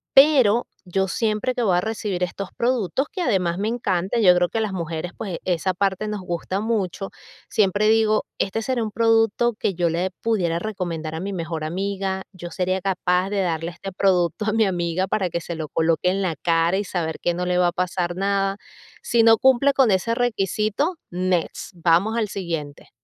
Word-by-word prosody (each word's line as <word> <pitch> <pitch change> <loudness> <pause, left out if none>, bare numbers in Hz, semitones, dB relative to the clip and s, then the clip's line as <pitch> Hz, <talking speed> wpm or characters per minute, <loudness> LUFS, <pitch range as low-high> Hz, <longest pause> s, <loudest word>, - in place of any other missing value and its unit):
Pero 265 -6 +6 0.2
yo 190 +2 0
siempre 220 +4 -1
que 245 - 0
voy 185 -4 +3
a - - +2
recibir 210 -4 -3
estos 190 +2 -4
productos, 245 - 0
que 370 - -4
además 180 - +1
me 210 - -1
encanta, 200 -2 -1
yo 180 -4 +6
creo 175 0 +3
que 225 - -2
a - - +1
las 215 -3 -1
mujeres, 170 0 -4
pues, 190 -6 -4
esa 185 +1 0
parte 195 +2 -1
nos 210 -2 -3
gusta 180 +2 -3
mucho, 200 -4 -2 0.4
siempre 205 +1 +2
digo: 220 -1 +3
"¿Este 200 +3 -1
será 245 0 -1
un 215 - -4
producto 225 +1 +2
que 195 - 0
yo 170 -1 +1
le 180 +3 -1
pudiera 180 -7 0
recomendar 170 -6 -4
a - - -4
mi 200 +1 -4
mejor 165 -3 -4
amiga? 190 +3 -2
¿Yo 175 -2 -8
sería 185 +1 -1
capaz 185 0 0
de 200 - 0
darle 165 -1 -1
este 190 +3 -8
producto 185 +1 +1
a 215 - +1
mi 225 -1 +3
amiga 175 0 -1
para 190 -2 0
que 170 - -2
se 170 - -5
lo 155 -1 -4
coloque 165 +3 +1
en 195 +1 -1
la 175 -4 -1
cara 165 +3 +2
y 205 - 0
saber 165 -3 -3
que 175 - 0
no 180 +1 -2
le 180 0 +1
va 175 - +4
a - - -3
pasar 180 -1 -1
nada?". 195 0 0 0.5
Si 235 - +3
no 225 -1 +7
cumple 265 +2 +4
con 265 -5 +4
ese 190 +5 +1
requisito, 220 - 0 0.2
next, 180 +1 -1
vamos 175 +6 +2
al 220 -2 +1
siguiente. 165 -7 -5
190 Hz, 200 wpm, -23 LUFS, 175-215 Hz, 0.5 s, no